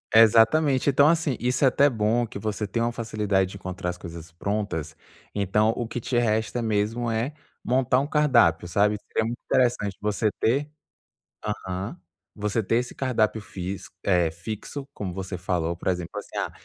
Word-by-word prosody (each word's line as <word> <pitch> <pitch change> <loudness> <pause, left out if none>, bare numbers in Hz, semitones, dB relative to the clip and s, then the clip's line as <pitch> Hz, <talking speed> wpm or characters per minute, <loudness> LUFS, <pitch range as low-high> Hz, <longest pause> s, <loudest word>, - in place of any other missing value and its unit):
Exatamente. 115 +6 +5
Então, 140 +1 +5
assim, 160 -4 +2
isso 125 +3 +1
é - - +7
até 140 +3 +4
bom 115 0 +1
que 105 - -8
você 105 -1 -2
tem 110 +3 -2
uma 120 +1 +1
facilidade 105 -5 0
de 100 - -8
encontrar 95 -1 -4
as 90 - -4
coisas 85 -2 -9
prontas. 85 -4 -3 0.4
Então, 105 +2 +2
o 120 - -2
que 115 +2 -4
te 120 +1 -1
resta 110 0 +1
mesmo 115 +2 0
é 115 +6 -1 0.3
montar 130 0 +2
um 140 - -1
cardápio, 120 - +3
sabe? 105 +4 +2
Seria 110 - 0
muito 120 +2 -4
interessante 120 -6 +1
você 105 +1 0
ter 140 +6 +1 0.7
aham, 95 - -4 0.4
você 105 +1 -1
ter 115 +4 +1
esse 125 0 -2
cardápio 115 -5 +1
físico, 95 -1 -7
eh, 90 -4 +3
fixo, 110 - -6
como 95 -4 -5
você 95 0 -5
falou. 85 -2 -1
Por 90 - -3
exemplo, 90 -2 -3
assim: - - -7
"Ah, - - -1
110 Hz, 175 wpm, -25 LUFS, 95-120 Hz, 0.7 s, é